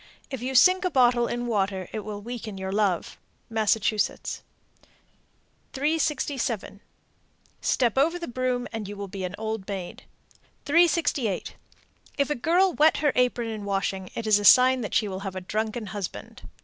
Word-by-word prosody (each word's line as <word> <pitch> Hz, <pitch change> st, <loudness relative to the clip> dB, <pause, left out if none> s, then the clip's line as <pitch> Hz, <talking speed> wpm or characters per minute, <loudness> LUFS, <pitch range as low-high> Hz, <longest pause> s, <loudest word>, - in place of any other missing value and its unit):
If 265 Hz, -3 st, -5 dB
you 260 Hz, +2 st, -3 dB
sink 365 Hz, +8 st, +6 dB
a 365 Hz, -, +1 dB
bottle 245 Hz, -5 st, +3 dB
in 240 Hz, 0 st, -3 dB
water, 195 Hz, -5 st, -1 dB
it 220 Hz, -, -2 dB
will 205 Hz, -1 st, -7 dB
weaken 225 Hz, -3 st, -6 dB
your 190 Hz, 0 st, -4 dB
love. 200 Hz, -4 st, 0 dB, 0.3 s
Massachusetts. 215 Hz, -1 st, 0 dB, 1.3 s
367. 275 Hz, -8 st, -1 dB, 0.8 s
Step 245 Hz, -2 st, +1 dB
over 330 Hz, +5 st, +2 dB
the 340 Hz, -, -6 dB
broom, 250 Hz, 0 st, -2 dB
and 220 Hz, -3 st, -4 dB
you 205 Hz, 0 st, -7 dB
will 200 Hz, 0 st, -5 dB
be 195 Hz, 0 st, -6 dB
an 180 Hz, +2 st, -5 dB
old 220 Hz, -2 st, -4 dB
maid. 190 Hz, -3 st, -6 dB, 0.6 s
368. 300 Hz, -, +2 dB, 0.6 s
If 280 Hz, 0 st, +1 dB
a -, -, +4 dB
girl 345 Hz, +8 st, +2 dB
wet 310 Hz, +2 st, +4 dB
her 295 Hz, -2 st, +2 dB
apron 245 Hz, -2 st, +1 dB
in 215 Hz, -2 st, -5 dB
washing, 195 Hz, -2 st, -2 dB
it 230 Hz, -, -4 dB
is 215 Hz, -1 st, +4 dB
a -, -, -4 dB
sign 255 Hz, +3 st, +7 dB
that 215 Hz, -, -4 dB
she 215 Hz, -, +2 dB
will 190 Hz, -1 st, -5 dB
have 195 Hz, -1 st, -6 dB
a 185 Hz, -, -4 dB
drunken 215 Hz, +4 st, -3 dB
husband. 190 Hz, -, -7 dB
225 Hz, 160 wpm, -26 LUFS, 200-260 Hz, 1.3 s, sign